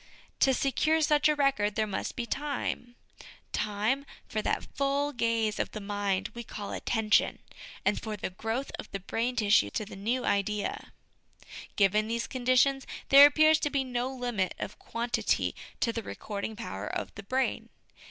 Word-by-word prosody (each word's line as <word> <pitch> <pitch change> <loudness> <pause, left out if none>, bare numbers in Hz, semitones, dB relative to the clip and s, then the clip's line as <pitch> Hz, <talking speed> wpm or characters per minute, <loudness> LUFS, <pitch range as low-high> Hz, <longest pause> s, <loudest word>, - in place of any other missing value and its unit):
To 270 - +5
secure 280 +5 +2
such 300 0 +4
a 300 - +3
record, 270 -8 +1
there 220 - +1
must 200 -2 -4
be 240 - -3
time; 270 -2 -3 0.6
time 215 +6 0 0.2
for 215 - -2
that - - -1
full 280 +1 0
gaze 230 -3 0
of - - -2
the 215 - -4
mind 200 -1 -1
we 235 - -6
call 210 -2 -7
attention, 220 -2 +2 0.5
and - - +2
for 215 -1 -4
the 190 - -4
growth 225 +8 -3
of - - -7
the 195 - -4
brain 230 +6 -2
tissue 205 - +4
to 210 - -3
the 200 - -10
new 230 +6 -1
idea. 200 +1 -1 0.8
Given 210 +2 +3
these 230 +1 -1
conditions, 255 +1 +2 0.2
there 280 +1 +11
appears 310 +1 +5
to 295 - 0
be 280 -2 0
no 250 0 -2
limit 245 -8 -2
of - - -6
quantity 235 +1 -1 0.3
to 230 - +1
the 230 - -2
recording 210 0 -5
power 230 - -5
of - - -4
the - - -8
brain. 260 +6 -1
230 Hz, 165 wpm, -29 LUFS, 210-270 Hz, 0.8 s, there